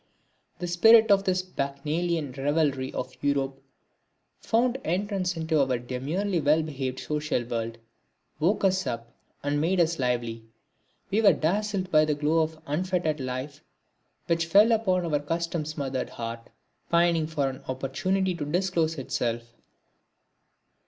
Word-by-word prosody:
The 175 - -4
spirit 220 +6 +6
of 195 0 +4
this 185 -1 +1
bacchanalian 155 0 -2
revelry 140 -2 0
of - - -5
Europe 140 -1 0 0.8
found 240 +3 +1
entrance 185 0 -1
into 160 -2 +1
our 130 -2 0
demurely 150 +10 -2
well 150 +2 +3
behaved 135 -4 -4
social 150 -4 -1
world, 115 -1 -4 0.6
woke 185 +8 +1
us 190 0 +2
up, 115 0 -4 0.3
and 145 +1 0
made 180 +4 +1
us 170 -1 +2
lively. 120 -3 -1 0.7
We 210 +3 +3
were 210 - +7
dazzled 190 +2 -1
by 155 0 +5
the 150 -1 0
glow 155 +3 +2
of 160 0 -2
unfettered 160 0 -1
life 130 +2 -5 0.6
which 165 -1 0
fell 205 +7 +6
upon 185 -6 +2
our 150 -3 +1
custom 165 +1 -2
smothered 135 -4 -3
heart, 115 0 -6 0.4
pining 170 -2 +3
for 150 -3 -1
an 130 0 -5
opportunity 180 +9 -1
to 170 -3 -4
disclose 165 0 0
itself. 120 -3 -3
155 Hz, 135 wpm, -27 LUFS, 135-180 Hz, 0.8 s, were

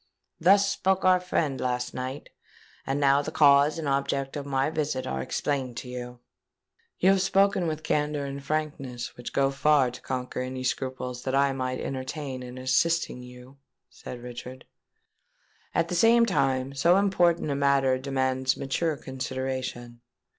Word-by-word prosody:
'—Thus 195 +4 +5
spoke 190 -1 0
our 185 -1 +6
friend 155 -7 -1
last 125 -1 -2
night; 130 +2 -5 0.6
and 135 +1 0
now 140 0 +4
the 145 - -5
cause 145 0 +5
and 160 -3 -3
object 140 0 -1
of 145 -1 -5
my 135 +2 0
visit 145 -4 -2
are 65 0 -3
explained 130 - -2
to 125 - -6
you." 125 0 -7 0.8
"You 190 - +4
have 195 -1 +3
spoken 195 -1 +2
with 155 -1 -3
a - - -29
candour 150 -1 0
and 140 0 -6
frankness 140 -5 -3
which 120 - -7
go 135 0 +2
far 135 -2 +3
to 125 - -11
conquer 125 -1 -4
any 130 0 -4
scruples 130 -1 -3
that 130 +1 -2
I 140 0 +3
might 130 -1 -3
entertain 130 0 -5
in 125 0 -8
assisting 140 +2 +1
you," 125 +2 -13 0.3
said 120 -1 -9
Richard. 125 +1 -9 1.1
"At 165 - +2
the - - -3
same 230 +6 +5
time, 135 - 0
so 170 +7 +4
important 175 -6 +2
a - - 0
matter 140 -2 +2
demands 130 -1 0
mature 150 +3 -1
consideration. 130 -2 -5
135 Hz, 160 wpm, -27 LUFS, 130-155 Hz, 1.1 s, our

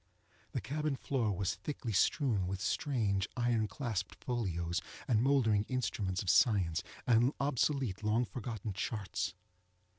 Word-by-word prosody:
The - - -1
cabin 145 +6 -1
floor 125 -5 0
was 95 -1 0
thickly 140 -6 -4
strewn 105 - +2
with 95 +1 -3
strange, 105 -4 0
iron 120 -3 +2
clasped 110 -7 -3
folios, 90 -9 -2 0.3
and 110 -3 +3
mouldering 120 -6 +3
instruments 105 -8 -1
of 95 - -2
science, 95 -9 +4 0.2
and 120 +3 +4
obsolete 135 -6 +1
long 110 +3 +2
forgotten 110 -1 -5
charts. 100 -1 -2
110 Hz, 125 wpm, -34 LUFS, 95-125 Hz, 0.3 s, science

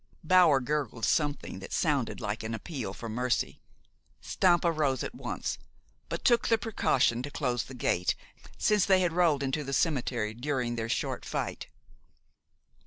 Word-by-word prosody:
Bower 170 -4 +6
gurgled 130 -5 -2
something 145 +5 0
that - - -9
sounded - - 0
like - - -3
an 110 +1 -3
appeal 120 - -5
for 105 +4 -7
mercy. 125 +3 -1 0.6
Stampa 175 -2 +2
rose 145 -5 0
at - - -5
once, - - -4 0.5
but - - -4
took 240 -2 +4
the 225 - +4
precaution 200 - +1
to 140 - -5
close 125 -5 -1
the 130 - -10
gate, 90 -7 +1 0.4
since 210 -3 +3
they 190 -2 +4
had 175 -2 +1
rolled 165 -5 +3
into 135 +3 -1
the 135 0 -5
cemetery 125 -8 0
during 125 -1 -2
their 115 -1 -3
short - - -2
fight. - - -4
140 Hz, 155 wpm, -29 LUFS, 120-170 Hz, 0.6 s, Bower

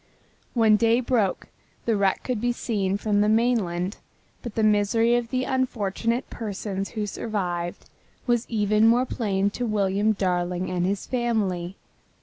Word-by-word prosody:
When 220 -3 +5
day 230 +2 +3
broke 235 -6 0 0.4
the 230 - +2
wreck 195 -2 +1
could 250 -5 -2
be 245 0 +1
seen 200 -5 -1
from 205 0 +1
the 210 - +3
mainland, 215 -5 +1 0.4
but 235 -4 -7
the 220 - +1
misery 215 +2 +3
of 240 -1 -1
the 255 0 0
unfortunate 240 -1 -1
persons 200 -2 -4
who 210 - 0
survived 180 -5 -3 0.4
was 240 -1 0
even 215 0 +3
more 240 +3 +4
plain 200 -5 0
to 245 - -3
William 205 0 +1
Darling 180 -2 -1
and 180 0 0
his 195 0 -2
family. 205 -7 -1
210 Hz, 145 wpm, -25 LUFS, 195-235 Hz, 0.4 s, When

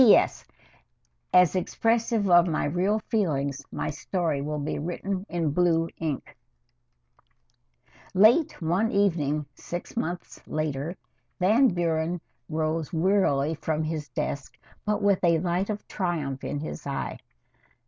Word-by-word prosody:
P. 225 - +9
S. - - +1 0.9
As 180 -1 +5
expressive 225 +2 +1
of 175 -1 +6
my 160 - 0
real 180 +8 +1
feelings, 140 - 0
my - - -2
story 160 -1 -1
will 150 +1 -3
be 145 +1 -3
written 185 +5 -3
in 165 -4 0
blue 165 0 +2
ink. 155 -4 -4 0.8
II - - -39 0.3
Late 240 +9 +5
one 190 +8 +1
evening, 155 - +1
six 175 +1 -7
months 175 -5 -4
later, 155 +2 -2 0.4
Van 220 +9 +5
Buren 170 -2 0 0.3
rose 155 0 -1
wearily 165 -4 +2
from 155 0 -2
his 155 -2 -3
desk, 140 +3 -4 0.3
but 210 0 0
with 200 -2 +3
a 170 -2 +5
light 180 +4 -1
of 210 -1 -4
triumph 155 -8 -2
in 145 - -3
his 155 - -6
eye. 140 - -3
170 Hz, 130 wpm, -27 LUFS, 155-195 Hz, 0.9 s, P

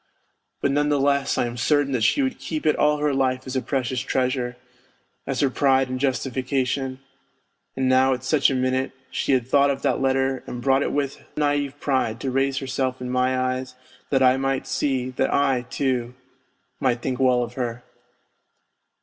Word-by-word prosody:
But 140 - +1
none 145 +1 +1
the 145 -1 +2
less, 140 0 +1
I - - +2
am 120 0 -5
certain 145 +1 +2
that 125 -3 0
she 280 - +3
would 265 - -2
keep 155 -1 -4
it 155 - +4
all 150 0 +3
her 150 -1 0
life 130 -1 0
as 130 0 -5
a 130 - +1
precious 130 -2 -1
treasure, 125 -1 -1 0.7
as - - -1
her 140 - +3
pride 135 -1 +2
and 130 0 -3
justification, 130 0 -1 0.8
and 130 -1 0
now 130 +1 +4
at 125 -1 -5
such 140 +1 +3
a 135 - -1
minute 130 +1 0 0.2
she - - 0
had 125 -2 +1
thought 140 +2 +4
of 135 -1 -2
that - - +1
letter 135 0 +1
and 125 - -5
brought 135 +2 +2
it - - -1
with 140 -1 -2 0.2
naive 145 -1 0
pride 130 -6 0
to 135 - -2
raise 135 +1 +1
herself 130 -1 -2
in 125 0 -5
my 130 0 +1
eyes 130 0 -2 0.3
that 135 -2 +3
I 130 0 +5
might 135 0 -1
see, 130 -3 -1
that 130 +1 0
I, 130 -3 +1
too, 125 -3 -1 0.6
might 120 -2 0
think 130 -2 -2
well 125 -2 +3
of 120 0 -7
her. 120 -1 -4
130 Hz, 190 wpm, -23 LUFS, 130-140 Hz, 0.8 s, I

